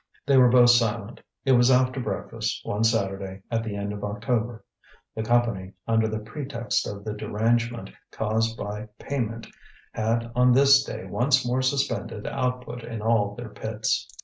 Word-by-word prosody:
They 140 0 +3
were 125 -2 +7
both 120 0 +7
silent. 115 -2 0 0.2
It 135 - +3
was 120 0 +5
after 130 0 +3
breakfast, 125 - -3
one 105 +2 -1
Saturday, 95 -3 -1
at 115 -1 0
the 110 -3 -4
end 100 0 -3
of 105 - -7
October. 115 +2 -2 0.5
The 110 - -4
Company, 110 -5 0
under 110 -1 +2
the 110 0 -3
pretext 115 +1 -3
of 100 0 -7
the 105 - -3
derangement 115 +3 -1 0.2
caused 110 +1 -1
by 105 +1 -5
payment, 115 -5 -3 0.5
had 115 +2 -1
on 125 0 +5
this 135 +1 +6
day - - -6
once 130 +1 +2
more 125 +2 +1
suspended 130 -5 -1
output 125 -1 -3
in 115 -2 -6
all 105 -3 +2
their 120 0 -7
pits. 110 +1 -2
115 Hz, 160 wpm, -25 LUFS, 105-125 Hz, 0.5 s, were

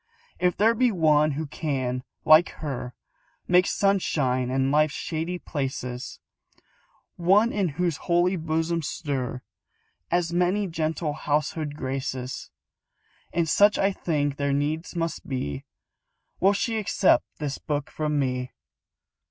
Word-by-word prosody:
If 180 -1 +1
there 220 +3 +4
be 245 +1 +2
one 155 -4 +3
who 155 +3 -3
can, 135 -4 -2 0.2
like 155 +3 +7
her, 130 -5 -5 0.5
Make 180 +1 +4
sunshine 140 -11 +1
in 135 +1 +1
life's 150 0 +3
shady 165 +2 -3
places, 130 -6 -4 1.0
One 200 +7 +4
in 200 -3 0
whose 175 -4 0
holy 175 +2 +2
bosom 165 0 -1
stir 135 -5 -3 0.7
As 170 -1 0
many 180 +4 +2
gentle 160 -2 -2
household 150 0 -1
graces 130 -2 -4 0.8
And 170 -1 0
such 205 +6 +5
I 195 +1 +2
think 145 -6 -1
there 140 -1 0
needs 150 +5 -2
must 165 -1 -3
be 70 - -3 0.7
Will 195 +2 +4
she 225 +2 -1
accept 195 -2 +3
this 145 -2 -4
book 145 -1 -3
from 150 -1 -1
me? 125 -2 -1
155 Hz, 125 wpm, -26 LUFS, 140-180 Hz, 1.0 s, like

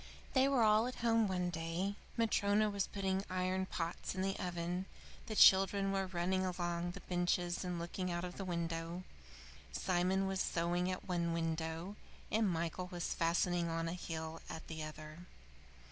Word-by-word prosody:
They 265 0 +5
were 270 -4 +4
all 215 +2 +5
at 250 -2 -5
home 225 -2 +4
one 180 -2 0
day. 165 +4 -2 0.2
Matryona 215 -2 +3
was 200 -2 0
putting 195 -1 -1
iron 185 +1 0
pots 170 +2 -3
in 185 - -1
the 195 0 0
oven; 175 +1 -2 0.4
the 215 - -3
children 195 0 +6
were 195 -1 0
running 185 +1 0
along 175 -1 -1
the - - -8
benches 175 0 0
and 180 -1 -2
looking 175 +2 -3
out 175 0 -2
of 180 - -7
the 195 - -3
window; 170 0 -3 0.7
Simon 185 +1 +1
was 190 0 0
sewing 175 +2 0
at 185 - -4
one 170 -2 0
window, 165 +3 -2 0.3
and 215 -2 +3
Michael 170 +1 -2
was 175 -1 -2
fastening 170 +1 +1
on 165 0 -1
a 165 - -2
heel 160 -2 -5
at 160 - -6
the 160 -1 -5
other. 155 +2 -8
180 Hz, 165 wpm, -36 LUFS, 170-195 Hz, 0.7 s, children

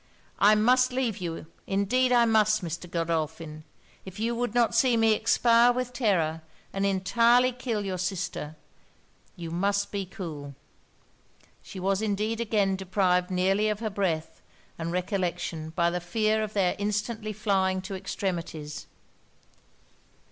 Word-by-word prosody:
I 210 +2 +6
must 250 +4 +4
leave 250 -5 -1
you, 170 -3 -5 0.2
indeed 230 +7 +1
I 240 -1 +5
must, 215 -2 +3
Mr. 170 +1 -5
Godolphin! 160 -2 -3 0.4
if 190 +2 -10
you 230 +2 0
would 240 -1 -2
not 235 -2 +3
see 250 -3 +3
me 225 -1 +4
expire 230 +2 +4
with 250 0 -3
terror, 170 -10 +1 0.3
and 195 0 0
entirely 235 +6 +3
kill 235 -4 -3
your 185 -2 -3
sister, 180 -4 -3 0.8
you 170 -2 -7
must 200 +4 0
be 200 -2 -3
cool.' 150 -7 -7 1.1
She 190 - -9
was 195 +2 0
indeed 215 +2 -1
again 205 -4 +1
deprived 185 -1 +1
nearly 190 +3 +2
of 210 -1 -2
her 220 -1 -3
breath 175 -6 -2 0.3
and 165 0 -4
recollection 180 -3 -2
by 170 +2 +1
the 180 0 -2
fear 215 +4 +1
of 215 -1 -4
their 190 -3 +1
instantly 210 +2 -2
flying 195 -3 0
to 195 - -6
extremities. 170 -5 -4
195 Hz, 140 wpm, -27 LUFS, 180-220 Hz, 1.1 s, I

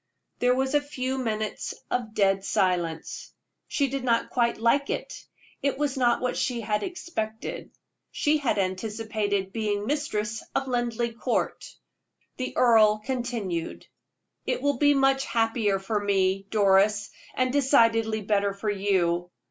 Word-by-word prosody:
There 250 0 +3
was 265 +1 0
a 295 - +4
few 265 -2 -3
minutes 215 -3 -3 0.2
of 225 -3 -2
dead 195 -1 +2
silence. 180 -5 -1 0.3
She 280 -2 +1
did 270 0 -3
not 235 -2 +1
quite 235 -2 +1
like 235 +5 +2
it; - - -4 0.4
it 280 -1 0
was 290 -1 -1
not 240 -3 +2
what 250 0 -1
she 240 -2 -1
had 210 -1 -1
expected. 225 - -5 0.4
She 300 +1 +1
had 275 -7 0
anticipated 205 0 -2
being 210 -2 -1
mistress 220 -6 -2
of 270 0 0
Linleigh 240 -2 -1
Court. 230 - -2 0.7
The 255 - -4
earl 220 -3 +5
continued: 225 -8 -3 0.6
"It - - -1
will 285 -3 +1
be 290 -1 +5
much 270 0 +3
happier 225 -3 +1
for 205 +2 -2
me, 195 -1 +1
Doris, 205 0 +3 0.2
and 255 0 +1
decidedly 230 -6 +3
better 200 -1 +1
for 210 +1 -2
you. 180 -3 0
225 Hz, 140 wpm, -26 LUFS, 205-255 Hz, 0.7 s, earl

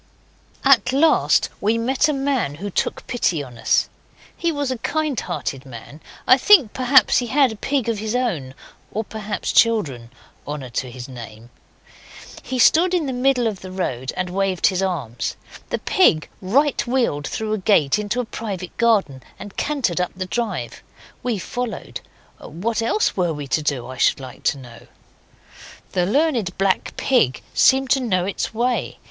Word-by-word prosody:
At 255 -3 +5
last 305 +5 +3
we 220 +3 +2
met 260 +5 +1
a - - +3
man 270 - -1
who 200 +6 -6
took - - -2
pity 175 -11 0
on 120 -3 -12
us. - - +2 0.5
He 340 - 0
was 285 -3 -2
a 255 - -3
kind 310 -1 -1
hearted 140 -6 -4
man. 135 +4 -11 0.2
I 255 - +6
think, 315 - +6
perhaps, 260 +1 +4
he 245 - -3
had 265 0 +3
a - - -6
pig 270 +2 -1
of 225 -3 -1
his 220 +2 -3
own 170 - -2 0.4
or, 220 - -2
perhaps, 215 -1 -4
children. 155 - +2 0.4
Honour 145 -4 -5
to 125 +2 -3
his 125 0 -8
name! 120 -2 -11 0.9
He 260 - -4
stood 350 +8 +5
in 340 -4 0
the 265 - -3
middle 250 -1 +2
of 210 -5 -2
the 185 - -8
road 130 -9 -3
and 180 -1 -2
waved 190 -1 0
his 185 -1 +2
arms. 150 -12 -3 0.3
The - - -1
pig 165 - +3
right 270 +10 +2
wheeled 235 - 0
through 215 -1 -3
a 215 - -1
gate 185 -4 +3
into 210 +4 -2
a 250 - -1
private 195 -5 -6
garden 205 - +2 0.2
and 205 - -10
cantered 245 - -1
up 180 - -2
the 185 0 -4
drive. 185 - -3 0.4
We 240 -3 -1
followed. 240 +3 -5 0.4
What 220 +8 -3
else 325 - +1
were 175 -3 0
we 145 -1 -6
to 155 - +1
do, 140 -5 -1
I 130 +1 -8
should - - +3
like 130 -2 -10
to - - +2
know? 120 -3 -13 1.0
The 180 -1 +1
Learned 240 - +1
Black 195 -1 0
Pig 155 - +1
seemed 265 -1 +4
to 275 - +4
know 185 -8 0
its 195 - -3
way. 240 +3 -1
210 Hz, 175 wpm, -21 LUFS, 155-255 Hz, 1.0 s, I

